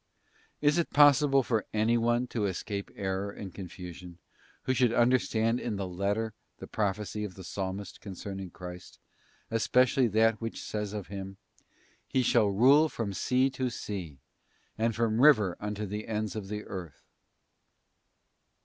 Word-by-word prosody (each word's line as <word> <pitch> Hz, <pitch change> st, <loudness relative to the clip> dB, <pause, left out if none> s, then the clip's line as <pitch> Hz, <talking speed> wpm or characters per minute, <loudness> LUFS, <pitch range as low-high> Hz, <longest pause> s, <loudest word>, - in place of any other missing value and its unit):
Is 150 Hz, +3 st, +3 dB
it 170 Hz, -, 0 dB
possible 140 Hz, -1 st, +5 dB
for 115 Hz, -3 st, -1 dB
anyone 120 Hz, +2 st, +2 dB
to 110 Hz, -4 st, -1 dB
escape 100 Hz, +2 st, -4 dB
error 95 Hz, 0 st, -2 dB
and 100 Hz, -2 st, -8 dB
confusion, 90 Hz, -1 st, -9 dB, 0.5 s
who 130 Hz, -, +1 dB
should 125 Hz, -2 st, +3 dB
understand 120 Hz, -1 st, +2 dB
in 115 Hz, -3 st, -3 dB
the 100 Hz, -1 st, -3 dB
letter 100 Hz, +4 st, -1 dB, 0.2 s
the -, -, -8 dB
prophecy 105 Hz, +1 st, -2 dB
of 100 Hz, -4 st, -6 dB
the 95 Hz, -, -10 dB
Psalmist 95 Hz, +1 st, -5 dB
concerning 95 Hz, -1 st, -6 dB
Christ, 90 Hz, 0 st, -10 dB, 0.5 s
especially 125 Hz, +3 st, +3 dB
that 110 Hz, +1 st, +2 dB
which 115 Hz, 0 st, -4 dB
says 105 Hz, -1 st, -4 dB
of 105 Hz, -4 st, -5 dB
Him, 95 Hz, -1 st, -7 dB, 0.7 s
'He 130 Hz, -, +1 dB
shall 115 Hz, -3 st, +4 dB
rule 135 Hz, +10 st, +5 dB
from 110 Hz, -7 st, -3 dB
sea 130 Hz, +6 st, +2 dB
to 130 Hz, -1 st, -2 dB
sea, 95 Hz, -, -6 dB, 0.6 s
and 115 Hz, 0 st, 0 dB
from 115 Hz, -1 st, +1 dB
the -, -, +2 dB
river 110 Hz, -12 st, +6 dB
unto 105 Hz, 0 st, -3 dB
the 105 Hz, +2 st, -5 dB
ends 110 Hz, -1 st, -2 dB
of 105 Hz, -3 st, -5 dB
the 105 Hz, +1 st, -4 dB
earth'? 90 Hz, -7 st, -8 dB
105 Hz, 150 wpm, -29 LUFS, 95-120 Hz, 0.7 s, river